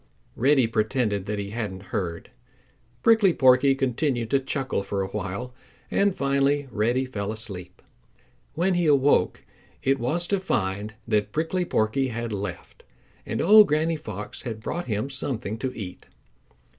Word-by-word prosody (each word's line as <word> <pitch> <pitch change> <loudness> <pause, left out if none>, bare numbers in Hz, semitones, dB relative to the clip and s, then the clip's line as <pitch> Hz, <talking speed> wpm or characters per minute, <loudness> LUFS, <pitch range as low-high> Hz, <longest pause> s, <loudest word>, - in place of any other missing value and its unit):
Reddy 135 +1 +4
pretended 110 -2 0
that 105 0 -2
he 100 0 -4
hadn't 100 -4 -5
heard. 90 -6 -3 0.7
Prickly 220 -6 +5
Porky 130 +1 +5
continued 130 -3 -1
to 140 - +4
chuckle 135 -3 -2
for 100 0 -2
a - - -3
while 105 +5 -4 0.4
and 200 -1 +2
finally 140 +1 +1
Reddy 120 +5 +1
fell 105 -5 -4
asleep. 95 -5 -8 0.7
When 180 +4 +2
he 175 -2 +1
awoke 140 -9 +3 0.4
it 135 0 +2
was 155 +9 0
to 200 - +3
find 105 - -2
that 105 -1 +1
Prickly 165 +3 -1
Porky 130 +1 +1
had 120 -2 -4
left 95 -3 -6 0.5
and - - -2
old 210 +3 +8
Granny 155 +2 +1
Fox 105 -8 -7
had 110 -3 -5
brought 175 +9 -3
him 110 +2 -2
something 120 -5 -3
to 130 - -2
eat. 95 -5 -8
125 Hz, 145 wpm, -25 LUFS, 105-140 Hz, 0.7 s, old